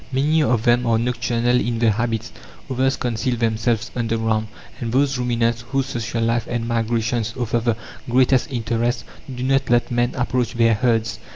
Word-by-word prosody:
Many 150 +5 +2
of 125 -6 +1
them 120 +1 +3
are 115 -1 +3
nocturnal 120 +1 +1
in 120 -1 -1
their 115 -1 +3
habits; 115 +1 -2 0.4
others 130 +1 +1
conceal 120 +1 -1
themselves 115 0 0
underground; 115 -2 0 0.3
and 115 -2 -3
those 135 +1 +2
ruminants 115 -1 0
whose 135 0 0
social 115 -3 -3
life 115 0 0
and 115 -1 -2
migrations 115 -1 -1
offer 120 -1 0
the 115 -1 0 0.3
greatest 130 +1 +3
interest 115 -1 -1 0.3
do 125 -1 -5
not 135 0 +1
let 120 0 +2
man 120 0 0
approach 125 -1 -1
their 115 -1 +4
herds. 115 -1 0
120 Hz, 165 wpm, -21 LUFS, 115-125 Hz, 0.4 s, their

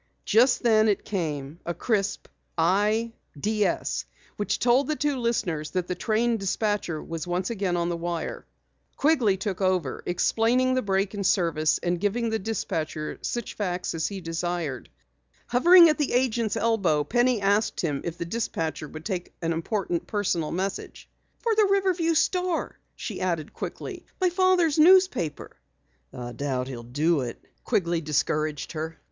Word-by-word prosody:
Just 245 +5 +4
then 220 -2 +4
it 200 - 0
came 155 -5 -3
a 170 - -3
crisp 205 -3 -1 0.3
"I 210 +7 +2 0.3
DS" 210 +3 0 0.3
which 205 - -1
told 250 +3 +3
the 310 - 0
two 290 -2 0
listeners 195 -11 -1
that 180 - 0
the - - -1
train 225 +4 +1
dispatcher 195 -3 -1
again - - -9
was 165 0 -5
on 175 +1 0 0.5
the 170 - -1
wire. 170 -1 -4 0.5
Quigley 260 -10 +3
took 190 0 -3
over, 185 -7 0
explaining 230 +8 +2
the 255 - +1
break 195 -1 0
in 200 -1 -3
service 165 -5 +2
and 175 0 0
giving 220 +4 0
the 220 - 0
dispatcher 160 -7 -3
such 240 -2 -3
facts 180 -3 -2
as 160 -2 -1
he 195 -2 -6
desired. 165 -5 -3 0.6
Hovering 340 +8 +8
at 305 -1 +1
the 295 - 0
agent's 235 -3 +1
elbow, 195 -10 +2
Penny 240 +6 +2
asked 200 +2 +1
him 145 -5 -1
if 170 -1 -4
the 170 - -4
dispatcher 165 -7 -3
would 155 +2 -10
take 185 -4 -4
an 165 0 +1
important 175 +1 -2
personal 180 -7 -1
message. 190 +3 -4 0.3
"For 460 -2 +1
the 430 -1 +4
Riverview 370 -4 +2
Star," 360 +1 0 0.2
she 205 -5 -6
added 170 -5 -2
quickly. - - -7
"My 365 -2 +2
father's 355 -4 +3
newspaper." 365 - +4 0.5
"I 120 -1 -7
doubt 130 0 -2
he'll 120 -3 -6
do 145 +6 +1
it," 120 -2 -5 0.2
Quigley 170 -3 0
discouraged 155 0 -1
her. 160 0 -5
195 Hz, 155 wpm, -26 LUFS, 165-235 Hz, 0.6 s, Hovering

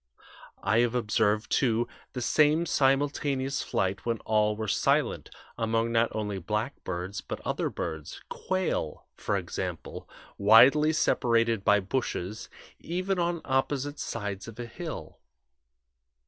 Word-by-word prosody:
I 110 +3 +3
have 120 0 +2
observed, 105 -2 +1
too, 120 -2 +2 0.3
the 125 - -3
same 155 +4 +3
simultaneous 140 -2 +1
flight 95 +1 -1
when 115 -1 -1
all 105 -1 +2
were 110 0 -4
silent, - - +1 0.3
among 115 0 +1
not 115 0 +3
only 105 -2 -2
blackbirds, 95 -2 -3
but - - -6
other - - -1
birds 80 -3 -5
quail, 185 - -2
for - - -1
example, - - -5 0.3
widely 130 +9 +7
separated 115 -7 +2
by 105 0 +4
bushes 105 -1 -3 0.3
even 185 +2 -2
on 170 -1 0
opposite 140 +2 -1
sides 100 -3 -4
of 115 0 -10
a 120 - -4
hill. 160 +8 -7
115 Hz, 120 wpm, -28 LUFS, 105-140 Hz, 0.3 s, widely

